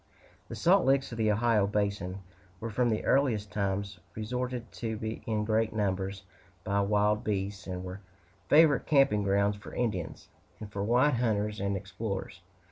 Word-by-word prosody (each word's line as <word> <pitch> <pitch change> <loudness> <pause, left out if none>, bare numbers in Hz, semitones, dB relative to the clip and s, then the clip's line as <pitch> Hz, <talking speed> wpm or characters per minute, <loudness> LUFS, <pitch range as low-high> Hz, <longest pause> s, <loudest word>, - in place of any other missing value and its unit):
The - - -7
salt 175 - +4
licks 135 0 +2
of 115 - -6
the 110 -1 +3
Ohio 110 -1 +2
basin 100 -2 -2 0.4
were 115 0 -5
from 120 +3 +1
the 110 - -1
earliest 115 -7 +2
times 100 -1 -2 0.2
resorted 125 +2 -3
to 110 -1 -4
in 105 -2 0
great 110 0 +1
numbers 95 -2 -2 0.4
by 100 +1 +1
wild 105 +1 +2
beasts, 100 -1 -3
and 90 -1 -4
were 95 +2 -7 0.5
favorite 150 -3 +5
camping 135 -8 +4
grounds 100 +1 +2
for 100 - -11
Indians, 100 -9 -3 0.3
and 105 -1 -8
for 100 -1 -3
white 125 +5 +3
hunters 105 -3 0
and 100 0 -1
explorers. 100 +1 -5
105 Hz, 155 wpm, -30 LUFS, 100-115 Hz, 0.5 s, favorite